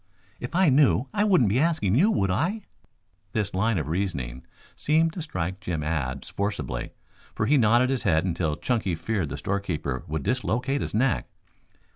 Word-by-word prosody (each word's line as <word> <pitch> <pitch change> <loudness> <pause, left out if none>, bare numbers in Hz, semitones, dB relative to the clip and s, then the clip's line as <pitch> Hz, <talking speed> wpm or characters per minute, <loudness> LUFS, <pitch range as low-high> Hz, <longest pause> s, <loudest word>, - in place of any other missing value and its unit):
"If 125 +7 -6
I 185 -2 +5
knew 135 -2 +4
I 205 -1 +2
wouldn't 180 - +4
be 120 - +2
asking 155 - +1
you, 170 - +4
would 95 - +1
I?" 175 - -1 0.7
This 105 -2 -1
line 105 +3 +1
of 80 - -2
reasoning 70 -9 -3 0.3
seemed 160 +2 +2
to 175 - -5
strike 95 - -4
Jim 85 -7 -3
Abs 70 -4 -2
forcibly, 75 -12 -3 0.4
for 110 - 0
he 145 - +4
nodded 120 +1 +4
his 135 - 0
head 80 -2 +2
until 80 -4 -1
Chunky 110 - -1
feared 90 -1 -2
the 70 - -5
storekeeper 85 -9 -3
would 75 -1 -3
dislocate 130 +2 0
his - - -3
neck. 125 +2 +1
105 Hz, 170 wpm, -26 LUFS, 80-135 Hz, 0.7 s, I